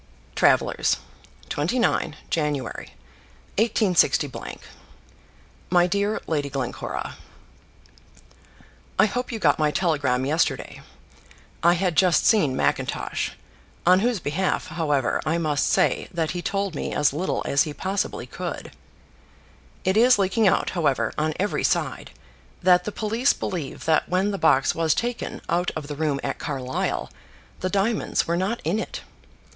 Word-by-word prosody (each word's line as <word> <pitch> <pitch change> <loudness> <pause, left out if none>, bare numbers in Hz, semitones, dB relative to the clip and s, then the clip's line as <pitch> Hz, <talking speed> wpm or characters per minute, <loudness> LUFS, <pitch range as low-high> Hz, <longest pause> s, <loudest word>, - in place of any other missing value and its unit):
Travellers', - - +3 0.5
29 165 -1 0 0.2
Jan., 150 -2 +1
186 165 - -1 1.5
MY 175 0 +5
DEAR 200 +4 0
LADY 145 -3 -1
GLENCORA, 135 -2 -4 1.8
I - - +6
hope 245 +5 -3
you 230 - -3
got 155 -8 +2
my 155 -1 +3
telegram 145 -7 +1
yesterday. 155 +4 -1 0.8
I 170 +1 +5
had 180 -1 0
just 175 +1 +4
seen 155 - +4
Mackintosh, - - -1 0.5
on 180 +2 +6
whose 235 0 +1
behalf, 180 +5 -1
however, 150 -6 0
I 160 +2 0
must 150 -3 0
say - - +2
that 165 -4 -1
he 175 - -4
told 195 0 -2
me - - -4
as 145 -2 +3
little 175 +6 -1
as 140 - +2
he 155 - 0
possibly 190 +6 -2
could. - - -6 1.1
It 190 0 +1
is 245 +2 +6
leaking 200 +2 +2
out, - - +2
however, 140 -10 0
on 155 0 -1
every 205 +2 0
side, - - 0 0.5
that 180 -1 +5
the 210 - -3
police 225 +6 +1
believe 165 -8 -5
that 160 -1 +2
when 185 +3 +1
the 195 - -3
box 135 -4 +4
was 165 -2 +1
taken 240 0 -3
out 175 +1 +1
of 155 - -4
the 145 0 -6
room 145 -2 0
at - - -3
Carlisle, 130 -3 -3 0.5
the 185 - -1
diamonds 205 +3 0
were 170 - +1
not 195 +7 -1
in 170 +8 0
it. - - -5
170 Hz, 135 wpm, -24 LUFS, 150-195 Hz, 1.8 s, I